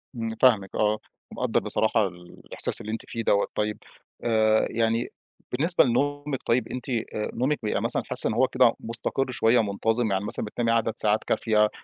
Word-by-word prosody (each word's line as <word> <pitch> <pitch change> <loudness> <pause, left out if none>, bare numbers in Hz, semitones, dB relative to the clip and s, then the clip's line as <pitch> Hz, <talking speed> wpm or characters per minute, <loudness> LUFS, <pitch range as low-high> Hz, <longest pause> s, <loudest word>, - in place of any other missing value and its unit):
إمم، 115 -1 -3
فاهمِك 110 -7 +4
آه 105 0 +1 0.3
ومقدّر - - 0
بصراحة 110 -1 +1
الإحساس 90 -1 -4
اللي 110 - -5
أنتِ 110 - -3
فيه 115 - -4
دوَّة، 100 -2 +2
طيب 105 0 -1 0.5
آآ، 110 -1 +3
يعني 115 +1 0 0.4
بالنسبة 165 +8 +3
لنومِك 145 +2 -1
طيب، 115 -1 +1
أنتِ 125 +1 -6
آآ 115 -3 -3
نومِك 135 +5 0
بيبقى 105 - -1
مثلًا - - -1
حاسة - - -3
إن - - 0
هو - - +3
كده - - +4
مستقر 120 +3 -2
شوية 115 -1 +3
منتظم، 110 +2 0
يعني 95 +1 0
مثلًا 105 - -2
بتنامي 115 +2 -1
عدد 115 -1 +1
ساعات 105 0 +1
كافية، 105 -1 +2
115 Hz, 170 wpm, -26 LUFS, 105-120 Hz, 0.5 s, فاهمِك